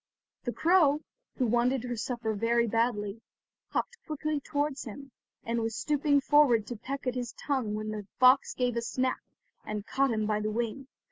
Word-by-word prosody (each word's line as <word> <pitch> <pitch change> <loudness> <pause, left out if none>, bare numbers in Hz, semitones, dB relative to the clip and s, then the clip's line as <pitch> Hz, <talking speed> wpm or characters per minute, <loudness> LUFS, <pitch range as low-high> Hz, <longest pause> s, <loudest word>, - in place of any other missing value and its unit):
The 245 - 0
crow, 315 -2 +4 0.4
who 255 - +2
wanted 240 +2 +2
her 245 -1 -3
supper 230 -1 -2
very 235 +3 +2
badly, 225 -2 0 0.5
hopped 475 - -2
quickly 305 -1 -2
towards 290 -1 -2
him, 270 +4 -9 0.3
and 230 0 -1
was 225 0 -2
stooping 290 -1 +2
forward 270 -7 +4
to 240 - -5
peck 270 +6 -6
at 255 - 0
his 245 -2 -4
tongue 255 -7 -2
when 215 0 -3
the 210 -2 -6
fox 255 +2 +5
gave 250 -2 0
a 235 - 0
snap, 255 +2 -1 0.4
and 210 -1 -4
caught 275 +3 +1
him 215 -2 0
by 210 0 +1
the 215 0 -1
wing. 235 +4 -3
245 Hz, 180 wpm, -29 LUFS, 225-275 Hz, 0.5 s, fox